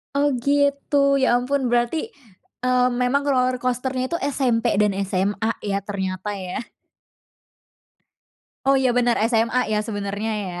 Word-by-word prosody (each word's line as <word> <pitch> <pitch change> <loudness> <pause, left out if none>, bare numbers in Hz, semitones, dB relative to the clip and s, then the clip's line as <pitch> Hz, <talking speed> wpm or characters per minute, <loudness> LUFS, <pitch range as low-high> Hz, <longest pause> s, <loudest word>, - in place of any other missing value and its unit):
Oh, 285 +1 +3 0.2
gitu. 280 0 +2
Ya 255 - +3
ampun 260 +3 +1
berarti, 240 +5 +1 0.7
eee, 250 0 +3
memang 275 +3 +1
roller 255 -2 +2
coaster-nya 255 +1 -2
itu 335 - +1
SMP 250 -5 0 0.2
dan 210 -2 +2 0.2
SMA 200 +4 0
ya 200 0 -1
ternyata 190 -1 -4
ya. 185 +4 -5 2.0
Oh, 275 - +4
iya, 260 -1 +2
bener 240 -1 +3 0.2
SMA 230 +2 +2
ya 210 - +2
sebenarnya 205 +1 -3 0.2
ya. 180 - -6
245 Hz, 130 wpm, -22 LUFS, 210-270 Hz, 2.0 s, Oh